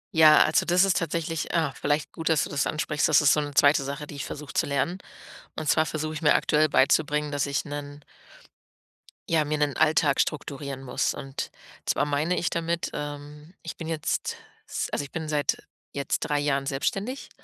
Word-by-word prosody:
Ja, 155 -1 +8
also, 155 - +2
das 180 +2 +4
ist 195 -2 +2
tatsächlich 165 -1 -3
ah, 160 -4 +1
vielleicht 145 +2 -1
gut, 165 0 -3
dass 160 -2 +3
du - - -5
das 145 0 0
ansprichst. 150 0 0
Das 150 - +6
ist 145 -2 +5
so - - +2
'ne 145 -1 -6
2. 145 -1 +5
Sache, 140 +2 -5
die - - -10
ich 140 - -5
versuche 150 -1 -8
zu - - +1
lernen. 145 +7 -1 0.6
Und 155 -2 -3
zwar 155 +2 +4
versuche 155 0 -3
ich 155 - -6
mir 150 - +6
aktuell 155 +1 +3
beizubringen, 150 +1 +2
dass 145 -1 0
ich 140 -1 -1
'nen 145 0 -7 1.3
ja, 160 -2 +3
mir 150 +1 -1
'nen 145 -2 0
Alltag 150 -2 +3
strukturieren 140 -2 -2
muss. 125 - -1
Und 135 0 -6 0.4
zwar - - +1
meine 150 +5 0
ich 170 - 0
damit, 170 0 -2
ähm, 145 +3 -7
ich 165 - -7
bin 165 - -6
jetzt, 160 -2 -2 0.3
s - - -3
also, - - -1
ich - - -14
bin 160 -1 -4
seit 145 -2 0 0.3
jetzt 140 -1 -1
3 145 0 0
Jahren 140 -1 0
selbstständig 195 - -3
150 Hz, 195 wpm, -26 LUFS, 145-160 Hz, 1.3 s, Ja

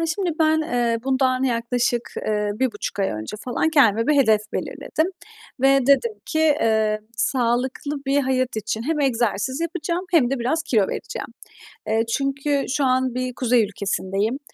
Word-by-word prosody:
Ya, 330 - 0
şimdi 350 +2 -1
ben, 315 0 +4
eee, 240 -5 0
bundan 260 -1 +1
yaklaşık, 240 -1 0 0.2
eee, 210 -1 0
1,5 220 -3 -3
ay 195 - +2
önce 110 - -5
falan 255 +5 0
kendime 230 -8 +4
bir 300 - +3
hedef 220 -6 +4
belirledim 315 - -2 0.5
ve 270 -1 +4
dedim 280 - +4
ki, 315 - -2
eee, 220 -9 +2 0.2
sağlıklı 250 +4 0
bir 280 +1 +3
hayat 255 -2 0
için 220 +1 -3
hem 300 +4 -1
egzersiz 245 0 0
yapacağım 340 +1 -2
hem 300 -9 +3
de 275 - -1
biraz 260 +7 0
kilo 225 -10 +1
vereceğim. - - -5 0.6
Eee, 220 +1 +2
çünkü 275 +2 0
şu 280 +2 +1
an 255 -1 +1
bir 255 0 -2
kuzey 245 -2 +3
ülkesindeyim 200 +3 -2
255 Hz, 155 wpm, -22 LUFS, 225-285 Hz, 0.6 s, ben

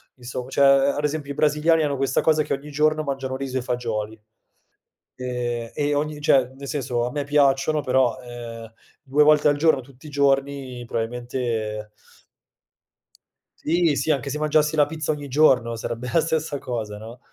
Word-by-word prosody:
insomm 125 0 -6
cioè, 135 - 0
ad 140 +1 +4
esempio 150 -1 -2
i - - -5
brasiliani 155 +2 +3
hanno 145 -2 -1
questa 135 -1 +1
cosa 155 -1 +3
che - - -2
ogni 145 +2 -6
giorno 155 +1 +2
mangiano 135 -2 -3
riso 130 -1 -3
e - - -1
fagioli 110 -3 -3 1.0
e 120 -2 -4
e 145 0 0
ogni 150 +1 -2
cioè, 140 -5 +4
nel 140 +1 -9
senso, 125 -5 -1
a - - -5
me 145 -1 -2
piacciono, 145 +1 +2
però, 130 -1 +2
ehm, 115 -2 -9 0.3
2 145 +2 +3
volte 150 0 +5
al 145 0 +3
giorno 155 -3 +3
tutti 130 +2 -18
i - - -8
giorni 135 -3 0
probabilmente 115 -2 -3 1.7
Sì, 165 -2 +1
sì. 160 - -2
Anche 140 -2 -1
se 150 - -3
mangiassi 150 0 +2
la 150 -2 +5
pizza 155 -1 -3
ogni 145 -2 -5
giorno 125 -5 +3
sarebbe 120 +2 -5
la 165 - +4
stessa 160 -2 -1
cosa, 110 -4 -5
no? 115 +3 -10
135 Hz, 170 wpm, -23 LUFS, 125-150 Hz, 1.7 s, volte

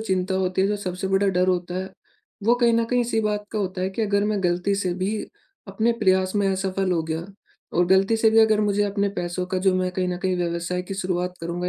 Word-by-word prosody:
चिंता 190 -3 -1
होती 190 0 0
है, 195 - +2
जो 210 - 0
सबसे 185 -1 -4
बड़ा 195 +1 +2
डर 180 -1 +2
होता 180 -1 -1
है, 190 +1 -5 0.5
वो 235 +3 +5
कहीं 240 -1 +3
न 230 - +2
कहीं 250 0 +3
इसी 235 -2 0
बात 210 -1 -1
का 215 - -1
होता 185 -2 -3
है 185 - -1
कि 210 +4 -3
अगर 200 -1 +1
मैं 210 -2 -1
गलती 180 +3 +1
से 185 -3 -1
भी 190 +4 -1 0.5
अपने 220 +4 +1
प्रयास 185 -1 +2
में 200 -1 +2
असफल 190 0 -1
हो 165 - +1
गया 160 +1 -4 0.5
और 175 - +4
गलती 195 +4 +3
से 220 0 +4
भी 225 - +4
अगर 220 -1 +4
मुझे 205 0 +1
अपने 200 0 0
पैसों 175 +1 -3
का 185 0 -2
जो 185 0 +2
मैं 185 0 0
कहीं 185 0 -1
न 180 - -2
कहीं 185 -1 +1
व्यवसाय 175 +1 -2
की 190 +2 -6
शुरुआत 180 -1 -2
करूँगा 175 +2 -3
190 Hz, 245 wpm, -23 LUFS, 180-205 Hz, 0.5 s, वो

